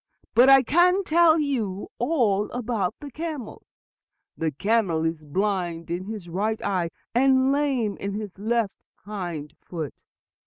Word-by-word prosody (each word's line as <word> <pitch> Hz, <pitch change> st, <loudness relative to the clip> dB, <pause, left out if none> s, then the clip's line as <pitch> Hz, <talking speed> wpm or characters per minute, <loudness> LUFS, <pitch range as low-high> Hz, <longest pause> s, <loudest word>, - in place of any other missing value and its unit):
"But 250 Hz, +3 st, +6 dB
I 270 Hz, -1 st, +8 dB
can 360 Hz, -, +4 dB
tell 335 Hz, -1 st, +5 dB
you 225 Hz, -10 st, -2 dB
all 235 Hz, -7 st, +1 dB
about 225 Hz, -5 st, -1 dB
the 290 Hz, -2 st, -9 dB
camel. 305 Hz, -6 st, -6 dB, 0.7 s
The 160 Hz, -, -1 dB
camel 180 Hz, 0 st, +1 dB
is 160 Hz, -1 st, -2 dB
blind 175 Hz, 0 st, -2 dB
in 180 Hz, +2 st, -3 dB
his 210 Hz, -4 st, -6 dB
right 210 Hz, +6 st, -1 dB
eye, 185 Hz, -4 st, 0 dB, 0.2 s
and 260 Hz, +2 st, +4 dB
lame 270 Hz, -7 st, 0 dB
in 200 Hz, 0 st, -4 dB
his 205 Hz, -3 st, -6 dB
left 225 Hz, -1 st, 0 dB, 0.3 s
hind 175 Hz, -8 st, -5 dB
foot. 160 Hz, -5 st, -5 dB
215 Hz, 140 wpm, -25 LUFS, 180-265 Hz, 0.7 s, I